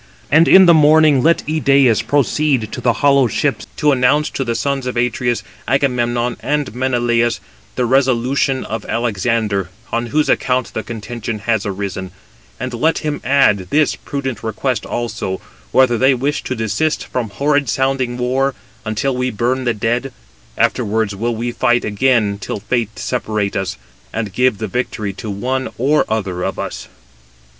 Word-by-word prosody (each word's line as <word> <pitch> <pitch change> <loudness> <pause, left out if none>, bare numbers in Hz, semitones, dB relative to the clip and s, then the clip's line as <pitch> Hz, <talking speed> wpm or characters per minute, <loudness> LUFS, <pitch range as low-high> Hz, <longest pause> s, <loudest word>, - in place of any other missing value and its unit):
But 160 +3 +6
in 190 0 +8
the 170 - +7
morning 155 -2 +5
let 165 +4 +2
Idæus 140 -6 +3
proceed 140 -4 +1
to - - -5
the 120 - +3
hollow 140 -2 +5
ships, 110 - -1
to 150 - +3
announce 135 +3 +2
to 135 - -2
the 115 -2 -2
sons 140 -1 -1
of 125 - -3
Atreus, 120 0 0 0.2
Agamemnon 120 -2 0
and 145 -3 -2
Menelaus, 120 -2 +1 0.4
the 125 - 0
resolution 130 +1 +1
of 110 -1 -4
Alexander, 110 -4 -1 0.2
on 120 +1 -1
whose 150 +5 +1
account 130 -1 0
the 110 - -2
contention 115 0 -5
has 110 0 -1
arisen; 95 -1 -4 0.5
and 125 0 -4
let 155 +8 +1
him 150 -1 -2
add 120 -8 +3
this 150 0 +2
prudent 135 -6 -5
request 115 +1 -2
also, 115 -5 -3 0.3
whether 120 -3 +4
they 130 +1 +4
wish 140 +4 -1
to 130 - -2
desist 110 +8 -1
from 120 -4 -3
horrid 145 +4 0
sounding 130 -2 0
war, 130 +2 0 0.3
until 115 +5 -1
we 125 0 0
burn 125 +3 -1
the 120 - +2
dead; 120 +5 -1 0.5
afterwards 105 -1 0
will 115 +3 -2
we 120 +2 -3
fight 120 0 +1
again 105 -2 +1
till - - -4
fate 110 +1 -2
separate 110 -4 -2
us, 95 -7 -2 0.3
and 110 -4 -4
give 125 0 +2
the 110 - -3
victory 110 -2 -3
to 105 +3 -7
one 130 +6 -2
or 140 +5 +2
other 100 -5 -2
of 95 +1 -2
us." - - -5
120 Hz, 160 wpm, -18 LUFS, 110-135 Hz, 0.5 s, in